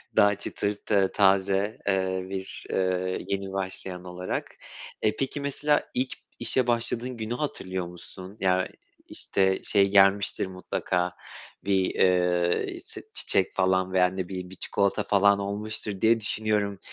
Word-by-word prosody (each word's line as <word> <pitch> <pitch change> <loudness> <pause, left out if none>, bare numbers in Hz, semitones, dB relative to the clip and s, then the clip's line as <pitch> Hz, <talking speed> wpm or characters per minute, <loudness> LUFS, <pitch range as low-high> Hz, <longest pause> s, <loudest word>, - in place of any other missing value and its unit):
daha 100 0 +5
çıtır 100 +1 -3
ta 100 -2 +2
taze, 100 +1 +2
eee, 95 -1 +1
bir, 95 0 -4
eee, 95 0 -1
yeni 100 -1 -3
başlayan 95 -1 -3
olarak. 90 0 -5 0.5
E 105 - +2
peki, 135 +3 -3
mesela 145 +1 0
ilk 130 +1 -1 0.3
işe 130 -2 +1
başladığın 120 +1 -1
günü 110 +1 -3
hatırlıyor 95 -9 -3
musun? 90 +3 -11
Ya 95 -1 +2 0.4
işte 95 -1 +1
şey 100 -2 +4
gelmiştir 100 0 +4
mutlaka; 90 -1 -2 0.5
bir, 95 -2 +2
eee, 90 -1 +2
s - - -10
çiçek - - +1
falan 95 0 +2
veya 90 -1 +5
ne 95 0 -4
bileyim 90 -1 -5
bir 95 - -10
çikolata 100 +2 0
falan 100 0 +4
olmuştur, 105 0 -4
diye 115 +1 +4
düşünüyorum. 105 -2 -1
95 Hz, 135 wpm, -27 LUFS, 95-105 Hz, 0.5 s, daha